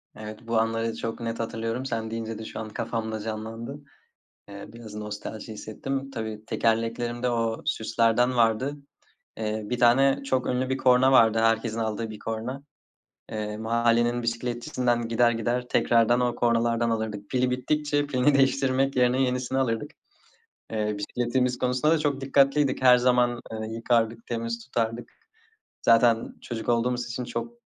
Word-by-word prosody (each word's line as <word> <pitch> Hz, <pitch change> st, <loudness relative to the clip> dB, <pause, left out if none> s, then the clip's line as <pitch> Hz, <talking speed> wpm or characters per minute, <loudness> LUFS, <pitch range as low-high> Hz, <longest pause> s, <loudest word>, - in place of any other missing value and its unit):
Evet, 110 Hz, +2 st, -9 dB
bu 115 Hz, -1 st, +1 dB
anları 115 Hz, 0 st, 0 dB
çok 115 Hz, +1 st, -4 dB
net 115 Hz, 0 st, -3 dB
hatırlıyorum. 115 Hz, +2 st, -3 dB
Sen 110 Hz, -3 st, -3 dB
deyince 115 Hz, -1 st, -4 dB
de 110 Hz, -, -7 dB
şu -, -, -7 dB
an 110 Hz, -1 st, -5 dB
kafamda 110 Hz, 0 st, -3 dB
canlandı. 115 Hz, +5 st, -6 dB, 0.7 s
Eee, 100 Hz, 0 st, -9 dB
biraz 115 Hz, -3 st, -10 dB
nostalji 105 Hz, +1 st, -6 dB
hissettim. 135 Hz, +6 st, -5 dB
Tabii 110 Hz, -3 st, -5 dB
tekerleklerimde 115 Hz, +2 st, 0 dB
o 115 Hz, -1 st, -1 dB
süslerden 115 Hz, +2 st, +1 dB
vardı. 120 Hz, +5 st, +2 dB, 0.6 s
Eee, 110 Hz, 0 st, -2 dB
1 120 Hz, +4 st, -3 dB
tane 135 Hz, +3 st, +4 dB
çok 130 Hz, -2 st, 0 dB
ünlü 130 Hz, +1 st, 0 dB
bir 130 Hz, -, +1 dB
korna 130 Hz, 0 st, +4 dB
vardı. 115 Hz, -3 st, +5 dB
Herkesin 115 Hz, 0 st, +1 dB
aldığı 110 Hz, 0 st, -2 dB
bir 110 Hz, -, -8 dB
korna. 115 Hz, +5 st, -5 dB, 0.7 s
Eee, 105 Hz, -1 st, -4 dB
mahallenin 115 Hz, +1 st, +2 dB
bisikletçisinden 120 Hz, 0 st, -1 dB
gider 120 Hz, +1 st, +3 dB
gider 120 Hz, +2 st, -1 dB
tekrardan 120 Hz, 0 st, +3 dB
o 120 Hz, -1 st, 0 dB
kornalardan 115 Hz, 0 st, +1 dB
alırdık. 110 Hz, -3 st, -3 dB
Pili 125 Hz, -1 st, +1 dB
bittikçe 145 Hz, +3 st, 0 dB
pilini 140 Hz, +1 st, +2 dB
değiştirmek 135 Hz, 0 st, +2 dB
yerine 125 Hz, +1 st, +3 dB
yenisini 125 Hz, 0 st, 0 dB
alırdık. 115 Hz, -4 st, -1 dB, 0.8 s
Eee, 105 Hz, -1 st, -1 dB
bisikletimiz 125 Hz, +4 st, -1 dB
konusunda 125 Hz, +4 st, +1 dB
da 165 Hz, -, +2 dB
çok 140 Hz, -3 st, -1 dB
dikkatliydik. 140 Hz, 0 st, +2 dB
Her 125 Hz, -1 st, +7 dB
zaman, 125 Hz, -1 st, +2 dB
eee, 110 Hz, 0 st, -4 dB
yıkardık, 115 Hz, -1 st, 0 dB
temiz 115 Hz, 0 st, -3 dB
tutardık. 115 Hz, -1 st, -2 dB, 0.7 s
Zaten 115 Hz, 0 st, +4 dB
çocuk 115 Hz, -2 st, -6 dB
olduğumuz 120 Hz, +1 st, +1 dB
için 120 Hz, +1 st, -4 dB
çok 115 Hz, 0 st, -5 dB
115 Hz, 145 wpm, -26 LUFS, 115-125 Hz, 0.8 s, Her